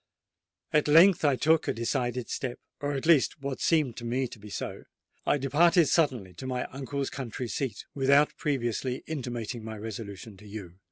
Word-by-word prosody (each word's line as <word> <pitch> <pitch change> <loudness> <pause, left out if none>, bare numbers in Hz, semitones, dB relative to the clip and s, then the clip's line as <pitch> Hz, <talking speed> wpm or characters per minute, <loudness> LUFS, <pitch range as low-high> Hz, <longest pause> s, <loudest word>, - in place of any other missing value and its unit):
At 150 0 +3
length 165 +5 +7
I 145 -3 +4
took 160 +4 +3
a - - +1
decided 120 +1 -1
step—or 145 +2 -5
at 135 +1 -3
least 155 -3 +4
what 140 -1 -4
seemed 150 -8 +2
to 120 - -7
me 125 +3 0
to 110 - -11
be 105 +1 -11
so: - - -5 0.4
I - - +4
departed 160 +4 +4
suddenly 125 - +1
to 130 - -6
my 125 -1 -2
uncle's 135 +1 -3
country 125 -2 -5
seat, 115 -3 -3
without 140 +2 +4
previously 125 -2 -2
intimating 120 -6 -4
my 110 0 -6
resolution 105 -1 -7
to 105 - -14
you. 100 -4 -8
130 Hz, 170 wpm, -28 LUFS, 115-145 Hz, 0.4 s, length